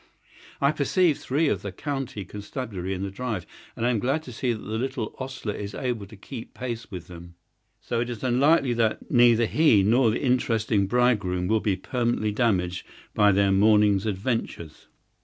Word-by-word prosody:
I 140 +1 +3
perceive 155 +2 +2
three 150 +5 0
of - - 0
the 100 - -5
county 135 -3 -4
constabulary 105 -3 -5
in 95 - -4
the 100 - -4
drive, 110 -3 -4 0.3
and 115 - -2
I 125 - +3
am 115 - 0
glad 135 +8 0
to 130 - -9
see 125 +2 -1
that 115 - -2
the 110 +1 -4
little 130 -3 -3
ostler 130 -5 -4
is 100 0 -6
able 120 -6 -3
to 110 - -13
keep 115 +4 -9
pace 120 -2 -5
with 90 -4 -7
them; 85 -1 -12 0.4
so 115 - -3
it 120 +1 -2
is 120 -1 -6
likely 130 +2 +3
that 115 -2 -1
neither 120 -2 +5
he 115 -6 +4
nor 115 +4 +4
the 110 - -1
interesting 115 -5 +1
bridegroom 100 -6 +1
will 110 +2 +2
be 105 -2 0
permanently 120 -1 -1
damaged 95 -6 0 0.3
by 105 0 +4
their 100 0 +3
morning's 105 0 +4
adventures. 100 -6 -3
115 Hz, 180 wpm, -25 LUFS, 100-125 Hz, 0.4 s, neither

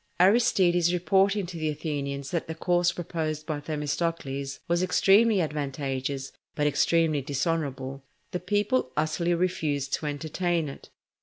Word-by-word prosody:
Aristides 180 -4 +4
reporting 195 +3 +2
to 175 -1 -7
the 155 -1 -1
Athenians 140 -2 -3
that 170 -2 -2
the 160 - -5
course 175 +1 +2
proposed 155 -3 -3
by 155 -2 -3
Themistocles 145 -2 -3
was 170 +1 +1
extremely 195 +4 +4
advantageous 135 -3 -3 0.2
but 150 - 0
extremely 155 +1 +2
dishonourable, 140 -1 -2 0.3
the 180 - -2
people 205 - 0
utterly 170 +3 +1
refused 155 -6 -1
to 155 - -1
entertain 160 +2 -1
it. 135 - -11
160 Hz, 130 wpm, -27 LUFS, 145-175 Hz, 0.3 s, Aristides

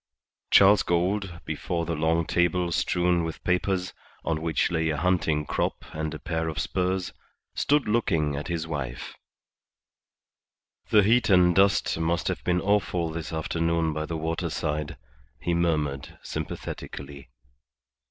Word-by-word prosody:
Charles 100 +1 +7
Gould, 90 +1 -1
before 85 -1 -2
the 85 - -2
long 80 +1 +1
table 85 +1 +1
strewn 90 0 +1
with 80 0 -5
papers, 90 0 0 0.3
on 80 -1 -1
which 80 -1 0
lay 80 -1 +1
a 75 - -1
hunting 80 -3 +1
crop - - -2
and 80 0 -3
a 80 - -5
pair 80 0 -2
of 80 - -4
spurs, 95 0 -1 0.4
stood 145 -2 +2
looking 85 -10 +1
at 75 - -4
his 85 -2 -2
wife: 75 -6 -5 1.8
"The 105 -1 +6
heat 115 +3 +3
and 90 -2 +5
dust 95 -3 +3
must 85 +1 0
have - - -3
been 90 0 +1
awful 95 -4 +1
this 80 -1 -5
afternoon 80 0 0
by 75 0 -3
the 80 - -3
waterside," 80 -2 -2 0.4
he 85 - -1
murmured, 75 -5 -1
sympathetically. 70 -2 -6
85 Hz, 135 wpm, -26 LUFS, 80-90 Hz, 1.8 s, Charles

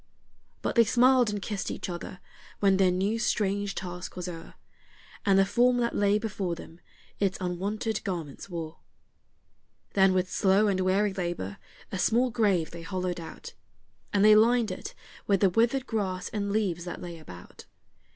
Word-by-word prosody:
But - - 0
they 235 - +6
smiled 245 +1 +4
and 210 0 -2
kissed 200 0 -4
each - - -5
other 180 0 -7 0.4
when 195 -2 +4
their 190 -1 +4
new 195 +5 0
strange 205 -3 0
task 180 0 -6
was 180 0 -5
o'er, 165 -2 -8 0.7
And 195 -1 +5
the 195 - +5
form 245 +4 +3
that 235 -1 0
lay 205 0 +3
before 200 -5 -3
them 165 0 -12 0.4
its 195 -2 +1
unwonted 200 +5 -2
garments 170 -3 -5
wore. 165 -3 -6 1.1
Then 190 -1 +4
with 185 0 +1
slow 200 +1 +3
and 195 -2 +1
weary 190 +2 +2
labor 175 - -4 0.3
a 190 - -3
small 240 +5 +2
grave 200 -8 +1
they 170 - -8
hollowed 180 0 -3
out, 165 - -9 0.6
And 205 0 +3
they 215 0 +8
lined 230 0 +4
it 185 - -7 0.3
with 200 -2 +2
the 195 -3 +4
withered 235 +6 +2
grass 190 -7 -2
and 200 -2 -2
leaves 195 -5 0
that 175 - -6
lay 170 -2 -8
about. 90 - -13
195 Hz, 165 wpm, -28 LUFS, 180-215 Hz, 1.1 s, they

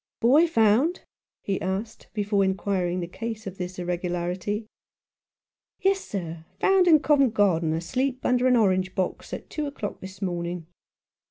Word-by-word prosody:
" - - -68
Boy 285 +9 +5
found? 235 - +3 0.2
" - - -68 0.2
he 195 -1 -2
asked, 195 +4 -4
before 205 -1 +1
inquiring 190 -2 0
the 170 - -4
cause 225 +4 -6
of 195 -1 -7
this 180 +1 -5
irregularity. 180 +3 -2 0.6
" - - -69
Yes, 390 0 +3
sir; 170 -5 -5 0.2
found 385 -2 +4
in 310 -4 +7
Covent 275 -7 +3
Garden, 170 -6 +3
asleep 255 +11 -2
under 250 0 +3
an 250 - +5
orange 185 -3 +2
box 185 -1 -2
at - - -6
two 305 -2 -2
o'clock 215 -7 -5
this 190 0 -9
morning. 175 -2 -3
200 Hz, 160 wpm, -26 LUFS, 180-250 Hz, 0.6 s, in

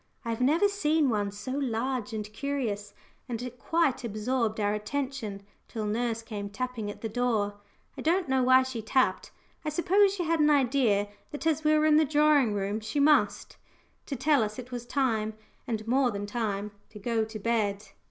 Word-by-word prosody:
I - - -3
have 230 +2 -3
never 315 +10 +4
seen 315 -8 +1
one 205 -2 0
so 205 +6 -7
large 255 -2 -2
and 215 -1 -3
curious, 220 -7 -3 0.3
and 235 -2 -3
it 250 0 -7
quite 325 -7 +1
absorbed 225 0 -1
our 205 0 +1
attention 220 -2 -4 0.2
till 220 -2 -4
nurse 230 +1 -1
came 205 -3 -5
tapping 230 0 -4
at 205 - -8
the 225 - -2
door 215 -3 -1 0.4
I - - -7
don't 355 +3 +1
know 265 -1 +2
why 260 +1 +6
she 260 -3 -5
tapped; 255 +4 +1 0.3
I 305 - -1
suppose 385 +6 +3
she 360 - -2
had 330 0 +1
an 300 0 +5
idea 250 -7 +3 0.2
that, 295 - -7
as 315 -1 +1
we 305 0 +4
were 305 - +3
in 305 -1 +5
the 315 - +5
drawing 295 -6 +3
room, 200 +2 -1
she 220 +6 -3
must 280 -9 +2 0.5
to 280 - -3
tell 285 +1 +3
us 215 -1 -2
it 255 0 -8
was 240 -1 -6
time, 225 -6 0 0.3
and 220 -2 -3
more 255 +1 +3
than 205 -2 -4
time, 210 -2 -2 0.2
to 215 - -12
go 225 +2 0
to 220 0 -6
bed. 210 -2 -1
240 Hz, 190 wpm, -28 LUFS, 215-280 Hz, 0.5 s, why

